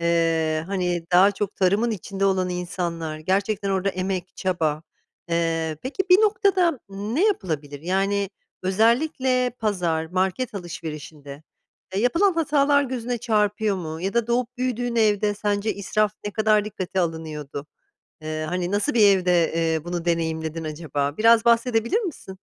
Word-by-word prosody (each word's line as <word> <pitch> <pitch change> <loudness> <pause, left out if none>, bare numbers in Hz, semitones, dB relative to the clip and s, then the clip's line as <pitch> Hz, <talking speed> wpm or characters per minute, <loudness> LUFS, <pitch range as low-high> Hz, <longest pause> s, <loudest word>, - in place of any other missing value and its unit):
Eee, 165 -2 +1
hani, 180 -3 -1
daha 190 +3 +7
çok 205 0 -4
tarımın 200 +5 +2
içinde 195 -1 -3
olan 190 -2 +2
insanlar, 170 -3 -3
gerçekten 195 +4 0
orada 190 0 0
emek, 185 -1 -3
çaba. 160 -5 -1 0.5
Eee, 165 -2 0
peki, 285 +9 -2
bir 365 - +8
noktada 395 - +2
ne 210 - -1
yapılabilir? 155 - -2
Yani, 195 +3 0 0.3
özellikle 250 - +2
pazar, 175 -7 0
market 190 +7 -1
alışverişinde 155 -5 -7 0.5
ya, 195 - +1
yapılan 335 - +3
hatalar 290 -3 +3
gözüne 245 -2 -3
çarpıyor 210 -3 +1
mu 160 -3 -5
ya 195 +4 -2
da 235 -2 +2
doğup 245 +1 -1
büyüdüğün 245 -1 -2
evde 210 -2 +2
sence 205 +1 -1
israf 210 +1 0
ne 205 - -2
kadar 215 0 +2
dikkate 190 -3 -3
alınıyordu? 155 -4 -4 0.6
Eee, 155 0 -3
hani, 180 +1 -2
nasıl 205 +9 0
bir 215 -3 +6
evde, 180 -3 +2
eee, 165 -1 0
bunu 175 -1 -4
deneyimledin 160 -1 -1
acaba? 150 -2 -3
Biraz 230 +1 +5
bahsedebilir 235 - +2
misin? 290 - -7
195 Hz, 140 wpm, -24 LUFS, 165-230 Hz, 0.6 s, bir